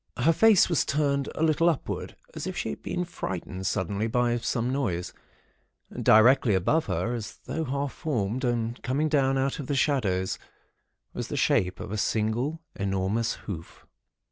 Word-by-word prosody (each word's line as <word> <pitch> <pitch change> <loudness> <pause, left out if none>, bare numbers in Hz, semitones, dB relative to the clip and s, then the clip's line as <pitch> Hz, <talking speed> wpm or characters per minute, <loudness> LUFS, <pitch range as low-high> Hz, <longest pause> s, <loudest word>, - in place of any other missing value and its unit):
Her 165 - +4
face 215 +3 +6
was 170 -5 +2
turned 140 -1 0
a 160 - -1
little 160 +2 +4
upward, 160 - -3 0.2
as - - -5
if - - -4
she - - -2
had 70 - -7
been 180 0 -2
frightened 95 - -5
suddenly 100 +4 -1
by 120 +1 +1
some 120 +1 -1
noise. 100 -11 -2 0.8
Directly 115 0 +5
above 155 - +1
her, 120 - -1
as 115 -3 -6
though 160 0 -2
half 140 +1 -2
formed 120 - -2
and 120 -1 -1
coming 145 +5 0
down 135 -2 +2
out 135 +2 0
of 140 - -5
the 140 - 0
shadows, 105 -10 +1 0.7
was - - -4
the - - -4
shape 90 0 +2
of - - -6
a 110 - -2
single, 120 +11 -1
enormous 100 +4 0
hoof. 85 -6 -8
125 Hz, 165 wpm, -27 LUFS, 105-145 Hz, 0.8 s, face